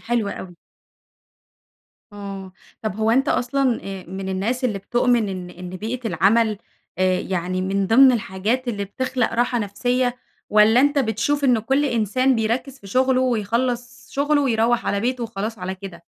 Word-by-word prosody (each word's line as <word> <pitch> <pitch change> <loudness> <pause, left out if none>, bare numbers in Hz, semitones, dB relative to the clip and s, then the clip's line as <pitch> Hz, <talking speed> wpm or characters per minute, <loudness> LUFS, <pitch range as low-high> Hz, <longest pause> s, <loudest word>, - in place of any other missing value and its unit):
حلو 235 -3 -1
أوي. 185 -2 -7 1.6
آه 195 -2 -8 0.3
طب 215 -3 -3
هو 220 0 +1
أنتَ 265 +5 +2
أصلًا، 255 0 +1
آآ، 195 -1 -6
من 190 +1 -5
الناس 220 +7 -2
اللي 215 -5 0
بتؤمن 240 +2 +1
إن 185 -2 -6
إن 180 0 -9
بيئة 225 +6 -5
العمل 210 +5 +2 0.4
آآ 185 -1 +2
يعني 185 0 -2
من 195 +1 0
ضمن 255 +4 +7
الحاجات 230 +3 -1
اللي 205 -4 -2
بتخلق 250 +4 -2
راحة 240 +1 +1
نفسية؟ 245 +4 -1 0.3
والّا 215 +3 +6
أنتَ 285 +1 +3
بتشوف 265 +4 0
إنه 245 -4 +4
كل 270 +6 +1
إنسان 255 +1 +1
بيركز 240 +4 -2
في 200 - -14
شغله 255 +4 +2
ويخلص 245 +1 -1
شغله 290 +1 +1
ويروح 235 -2 +1
على 200 - 0
بيته 250 +2 -1
وخلاص 220 0 -5
على 185 +1 -4
كده؟ 185 -3 -10
225 Hz, 155 wpm, -22 LUFS, 195-250 Hz, 1.6 s, ضمن